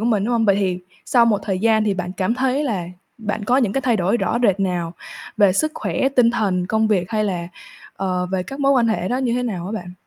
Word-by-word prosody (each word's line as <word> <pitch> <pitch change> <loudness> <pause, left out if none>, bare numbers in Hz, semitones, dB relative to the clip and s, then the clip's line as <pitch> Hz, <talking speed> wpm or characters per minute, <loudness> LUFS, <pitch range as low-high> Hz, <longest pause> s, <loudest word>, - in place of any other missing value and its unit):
của - - -2
mình, 215 -4 +1
đúng 240 +2 0
không? 230 -1 +2
Vậy 200 -2 +4
thì 185 -3 0 0.3
sau 235 -2 +4
một 215 -3 +2
thời 190 -3 -2
gian 220 +1 +3
thì 205 -2 +1
bạn 180 -1 -4
cảm 190 +4 -1
thấy 265 +3 0
là 205 -10 -2 0.3
bạn 210 -1 -3
có 245 +4 +2
những 240 -7 +2
cái 270 - 0
thay 250 -3 +1
đổi 190 +3 +1
rõ 235 - 0
rệt 200 -4 +3
nào 175 -3 -1 0.4
về 205 -3 +5
sức 310 +11 0
khỏe, 265 - -1
tinh 250 -4 +3
thần, 190 -6 0
công 220 +3 +1
việc 180 -4 0
hay 215 -1 0
là, 175 -4 -3 0.5
ờ, 185 -1 -1
về 185 0 -2
các 270 +9 -8
mối 275 0 +4
quan 245 -4 +3
hệ 205 -4 -1
đó 250 - 0
như 255 -3 0
thế 250 - -1
nào 190 -8 -3
hả 200 - -5
bạn? 180 -5 -6
215 Hz, 270 wpm, -21 LUFS, 185-240 Hz, 0.5 s, về